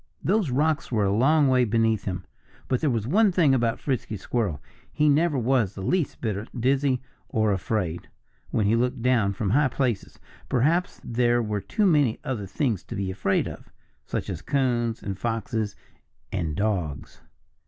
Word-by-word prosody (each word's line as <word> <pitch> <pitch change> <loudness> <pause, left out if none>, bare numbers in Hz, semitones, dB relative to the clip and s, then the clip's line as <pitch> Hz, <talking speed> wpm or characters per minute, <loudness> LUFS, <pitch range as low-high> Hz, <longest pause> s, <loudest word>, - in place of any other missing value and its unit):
Those 200 -3 +2
rocks 150 +4 0
were 110 -4 +2
a 100 +1 +1
long 145 +5 +4
way 130 -1 +4
beneath 110 -2 +1
him. 90 -2 -4 0.4
But 130 - 0
there 155 - +2
was 115 -4 -1
one 200 - +4
thing 165 -6 +4
about 115 -3 +1
Frisky 125 -6 -2
Squirrel 100 - -2 0.3
he 150 - +2
never 150 +1 +3
was 120 -5 +1
the 95 - -6
least 175 - -1
bit 110 -1 -3
dizzy, 130 +1 +1 0.3
or 110 -1 +1
afraid, 95 -3 -2 0.4
when 110 - +1
he 105 +3 +3
looked 125 +1 0
down 115 -6 +3
from 95 0 -2
high 145 +4 +4
places. 125 -5 -2 0.3
Perhaps 160 +9 +1
there 120 0 +2
were 105 -2 -2
too 210 - 0
many 145 - +3
other 110 -7 -3
things 110 - -1
to - - -7
be 95 -1 -2
afraid 100 +1 0
of - - -9 0.3
such - - -4
as - - -4
coons 120 -4 0
and 95 -2 -4
foxes 115 -1 -2 0.6
and 85 -6 -2
dogs. 90 -8 -2
120 Hz, 170 wpm, -25 LUFS, 105-135 Hz, 0.6 s, long